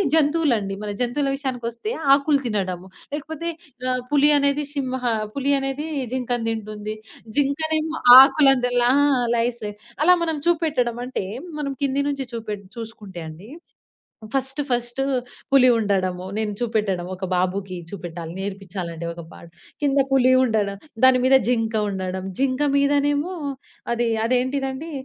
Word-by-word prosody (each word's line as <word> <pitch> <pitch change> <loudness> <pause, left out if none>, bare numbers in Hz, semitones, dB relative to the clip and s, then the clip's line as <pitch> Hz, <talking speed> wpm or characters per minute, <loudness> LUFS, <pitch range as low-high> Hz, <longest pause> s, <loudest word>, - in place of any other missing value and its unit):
జంతువులండి. 285 -11 +2
మన 205 - -3
జంతువుల 275 +3 0
విషయానికొస్తే 250 - -4 0.2
ఆకులు 285 0 +2
తినడము 190 -4 -2 0.3
లేకపోతే 320 +3 -4 0.4
ఆహ్, 250 0 -1
పులి 290 0 +5
అనేది 280 +1 +1
సింహ 260 -2 -2 0.3
పులి 280 +1 0
అనేది 270 +3 -3 0.3
జింకను 245 -2 -1
దింటుంది. 215 -1 -5 0.4
జింకనేమో 315 +3 0 0.2
ఆకులను 270 -2 +6
తినలా 245 0 +2 0.3
ఆ! 245 - 0
లైఫ్ 235 +1 0
సే 210 - -3 0.3
అలా 360 +2 +7
మనం 320 -2 -1
చూపెట్టడం 305 -9 +1
అంటే, 250 -6 -3 0.3
మనం 280 -2 -2
కింది 275 +1 +1
నుంచి 275 -2 -3
చూపెట్ 210 -3 -5
చూసుకుంటే 210 -6 -8
అండి, 180 +9 -12 0.9
ఫస్ట్ 270 +2 -1
ఫస్టు 240 +2 -1 0.5
పులి 255 -2 +7
ఉండడము, 185 -4 0
నేను 215 -1 -1
చూపెట్టడం 210 -6 -1
ఒక 190 +1 -6
బాబుకి 185 +1 -1
చూపెట్టాలి, 170 -3 -7
నేర్పిచ్చాలంటే 185 -4 -5
ఒక 170 0 -9
పాట - - -13 0.4
కింద 280 -1 +2
పులి 255 -1 +4
ఉండడం, 210 -5 0 0.3
దాని 260 -1 +7
మీద 265 +1 +6
జింక 225 -2 0
ఉండడం, 190 -1 -4 0.2
జింక 265 0 +1 0.2
మీదనేమో 290 +4 +2 0.6
అది 235 0 0 0.2
అదేంటిదండి? 265 +4 -1
245 Hz, 130 wpm, -23 LUFS, 205-280 Hz, 0.9 s, అలా